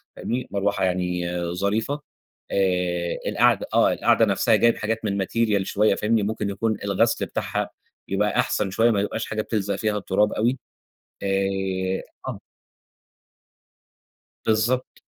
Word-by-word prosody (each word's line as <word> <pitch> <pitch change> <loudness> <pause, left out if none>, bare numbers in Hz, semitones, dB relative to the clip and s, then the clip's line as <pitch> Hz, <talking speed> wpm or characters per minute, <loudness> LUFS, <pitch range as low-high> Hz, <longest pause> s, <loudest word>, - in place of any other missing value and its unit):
فاهمني. 125 +1 -3
مروحة 100 0 0
يعني 90 -1 -1 0.2
ظريفة، 110 +10 -1 0.5
آآ 90 -2 0
القعدة - - +3
آه، - - +4
القعدة - - +3
نفسها - - +3
جايب 115 0 +3
حاجات 110 +1 -2
من 100 -1 0
Material 110 -2 +1
شوية 105 +3 +2
فاهمني. 110 0 +1
ممكن 105 0 -2
يكون 110 +1 -1
الغسل 100 +3 +1
بتاعها - - -2 0.4
يبقى 105 +1 +1
أحسن 100 -2 +1
شوية، 115 +4 +3
ما 100 -3 +1
يبقاش 110 +2 -2
حاجة 110 - -2
بتلزق 100 -2 -1
فيها 105 +1 -1
التراب 105 +1 +1
أوي، 120 +4 +1 0.6
آآ 95 -1 -1 0.3
آه. - - -4 2.1
بالضبط. 115 +4 0
100 Hz, 125 wpm, -24 LUFS, 95-110 Hz, 2.1 s, آه